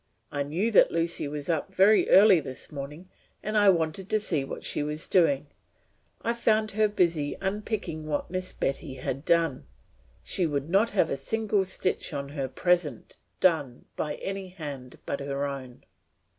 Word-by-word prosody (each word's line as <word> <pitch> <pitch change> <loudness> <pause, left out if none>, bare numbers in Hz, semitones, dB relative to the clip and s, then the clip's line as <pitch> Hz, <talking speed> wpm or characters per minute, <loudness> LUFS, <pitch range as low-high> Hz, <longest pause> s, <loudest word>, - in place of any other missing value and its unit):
I 145 - -2
knew 170 +11 -1
that 210 - +6
Lucy 165 -2 -1
was 145 0 -5
up 160 -3 -1
very 205 +3 +5
early 195 -2 +7
this 130 -1 -6
morning 150 +5 -7 0.4
and 215 +1 -3
I 205 -1 +6
wanted 170 +2 0
to 215 - +2
see 160 -9 -1
what 135 - -7
she - - -1
was 150 +1 -2
doing; 150 -7 +3 0.8
I 235 - +1
found 220 -2 +2
her 215 +1 +3
busy 170 -7 +1
unpicking 195 -5 -3
what 150 +2 -2
Miss 185 0 -3
Betty 135 0 -3
had 130 +1 -4
done. 165 - +1 0.6
She 180 - 0
would 145 +1 -3
not 205 +5 +4
have 190 -6 +1
a 140 - -1
single 210 +7 0
stitch 185 -2 -1
in 140 -1 -4
her 140 -2 -3
present 155 -1 0 0.2
done 150 -9 +1
by 150 -1 -2
any 195 -1 -5
hand 145 -8 -8
but 140 - -3
her 140 0 -2
own.'" 130 -3 -7
165 Hz, 170 wpm, -27 LUFS, 140-195 Hz, 0.8 s, early